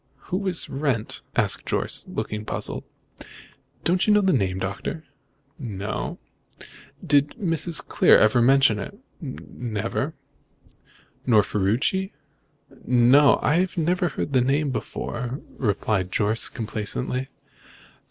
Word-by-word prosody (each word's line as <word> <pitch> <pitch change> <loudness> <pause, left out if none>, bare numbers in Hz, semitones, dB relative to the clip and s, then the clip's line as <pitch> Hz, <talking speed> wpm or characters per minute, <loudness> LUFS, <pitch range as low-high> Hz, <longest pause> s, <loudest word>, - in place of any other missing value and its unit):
"Who 195 +1 -1
is 180 -3 +1
Wrent?" 135 -6 -2
asked - - +2
Jorce, - - -1
looking 105 0 -4
puzzled. - - -3 1.0
"Don't 180 +4 +1
you - - +5
know 210 - +5
the 190 -1 +2
name, 95 -7 0
Doctor?" 100 +11 -4 0.6
"No." 105 -6 -4 0.9
"Did 145 0 +3
Mrs. 165 - +1
Clear - - +5
never 110 +3 +4
mention 135 +3 +4
it?" 200 - -7 0.2
"Never." 120 - -4 1.1
"Nor 110 -4 +5
Ferruci?" 115 - 0 0.7
"No. 125 +4 +5
I 175 +5 +3
never 175 +2 +1
heard 145 - -4
the 130 - +4
name 140 +3 +1
before," 125 +1 -4 0.2
replied 100 -4 -1
Jorce 110 +1 +2
complacently. 115 +4 -3
130 Hz, 110 wpm, -24 LUFS, 110-160 Hz, 1.1 s, you